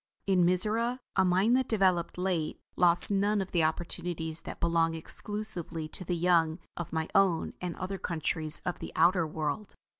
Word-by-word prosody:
In 190 -3 +2
Mizora, 215 +7 +1 0.2
a 190 - +3
mind 190 +6 +2
that 260 -1 -1
developed 185 -6 +1
late 180 -4 -2 0.2
lost 175 +2 +5
none 205 +1 +1
of 190 -1 -4
the 170 -3 +1
opportunities 160 0 -3
that - - -9
belong 165 -1 +1
exclusively 175 -2 -1
to 185 - -3
the 180 0 -2
young 165 -2 +2 0.2
of 175 - -6
my 160 0 -2
own 190 -4 +2
and 180 -2 -4
other 190 +1 -5
countries 160 -1 +2
of 180 - -3
the - - -7
outer 170 0 +3
world. 155 +6 -4
175 Hz, 170 wpm, -29 LUFS, 165-195 Hz, 0.2 s, lost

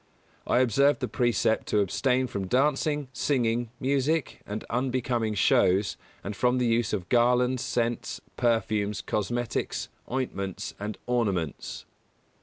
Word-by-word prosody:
I 125 - +4
observe 140 +4 +4
the 125 - -2
precept 120 -1 +1
to 105 - +2
abstain 125 +6 +1
from 100 -6 -4
dancing, 145 +3 +1
singing, 120 -3 0
music 140 +3 0
and 105 +1 -4
unbecoming 120 -3 0
shows, 95 +1 +3 0.3
and 100 +2 -4
from 125 +3 +2
the 125 - +1
use 115 -1 +1
of 95 -4 -2
garlands, 125 +1 +3
scents, 120 -1 -1 0.2
perfumes, 105 -3 0
cosmetics, 120 +3 -2 0.2
ointments, 100 -8 -3
and 105 +1 -4
ornaments. 100 - -1
120 Hz, 120 wpm, -27 LUFS, 105-130 Hz, 0.3 s, I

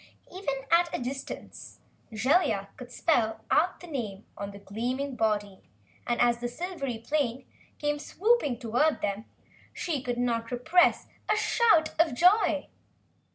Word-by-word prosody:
Even 280 -8 -3
at 340 +1 +5
a - - -2
distance, 265 +2 -7 0.3
Jellia 220 - +2
could 250 -1 -11
spell 235 -8 +1
out 340 +4 +2
the - - -9
name 225 - -5
on 200 - -5
the 200 - -10
gleaming 245 +7 -3
body 205 -4 -1 0.5
and, 240 0 0
as 240 -1 +3
the 240 - -2
silvery 275 -3 -4
plane 260 0 -1 0.3
came 295 0 -1
swooping 375 - +1
toward 245 +7 +1
them, 205 +2 -2 0.5
she 315 -7 -2
could 245 -2 -3
not 230 -2 -1
repress 320 +9 +3 0.3
a - - +4
shout 430 -7 +3
of 325 -6 +3
joy. 365 - +3
255 Hz, 140 wpm, -28 LUFS, 230-320 Hz, 0.5 s, at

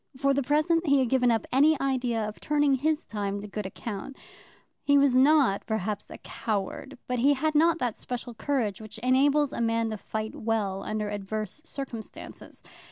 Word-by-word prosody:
For 275 +1 +2
the 280 - +1
present, 310 +5 +1
he 280 0 +5
had 260 -3 +2
given 250 -1 +3
up 225 -2 +1
any 290 +3 +4
idea 245 -5 0
of 210 - -8
turning 290 -2 +2
his 300 +4 0
time 205 -2 -3
to 205 - -7
good 210 -1 -4
account. 210 +6 -7 0.7
He 285 0 +4
was 280 -2 +4
not 265 -6 +4
perhaps 210 -1 -3
a - - -9
coward, 220 +5 -4
but 250 -1 -1
he 280 +4 +4
had 310 +3 0
not 330 +2 +4
that 245 -7 -2
special 245 -1 -6
courage 225 -4 -1
which 220 +1 -9
enables 280 +3 +3
a - - -3
man 230 -1 +1
to 215 - -3
fight 220 +2 -5
well 210 -4 -1
under 215 0 -3
adverse 210 +5 -4
circumstances. 260 -8 -8
250 Hz, 180 wpm, -27 LUFS, 215-280 Hz, 0.7 s, he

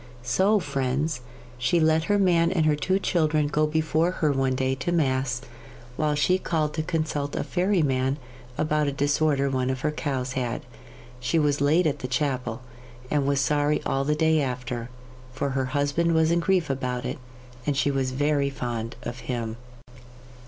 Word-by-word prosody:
So, 190 - +3
friends, 140 -2 -1 0.4
she 125 +8 +2
let 160 0 +3
her 205 +2 +2
man 170 -3 +3
and 165 -4 +2
her 155 -1 +4
two 185 +6 +1
children 155 -5 +1
go 150 +1 +1
before 160 +2 +1
her 155 -4 +1
one 135 -1 +1
day 130 0 0
to 135 +6 -2
Mass, 130 -6 +1 0.5
while 150 +1 +1
she 180 +6 +2
called 155 -5 -1
to 160 - -1
consult 155 -3 -2
a - - -1
fairy 185 -1 +1
man 135 0 +1 0.4
about 150 -1 +1
a - - +1
disorder 145 0 +2
one 130 -1 0
of 130 -1 -2
her 150 - +1
cows 130 -4 -3
had. 125 -3 -2 0.6
She 125 +7 0
was 145 -2 +2
late 155 +5 +3
at 145 -2 0
the 125 - -4
chapel, 125 -2 -2 0.5
and 145 -2 +1
was 140 -1 +2
sorry 145 +2 +2
all 135 0 0
the 150 +2 +1
day 160 0 +3
after, 125 -2 -3 0.4
for 140 +1 -2
her 135 0 0
husband 145 +5 +1
was 160 0 +3
in 170 - +3
grief 175 -3 +1
about 125 -2 -3
it, - - -4 0.5
and 145 -2 +1
she 145 0 +2
was 135 -1 0
very 140 +1 +1
fond 120 -4 -4
of 120 +1 -5
him. 115 -3 -2
145 Hz, 180 wpm, -25 LUFS, 130-155 Hz, 0.6 s, her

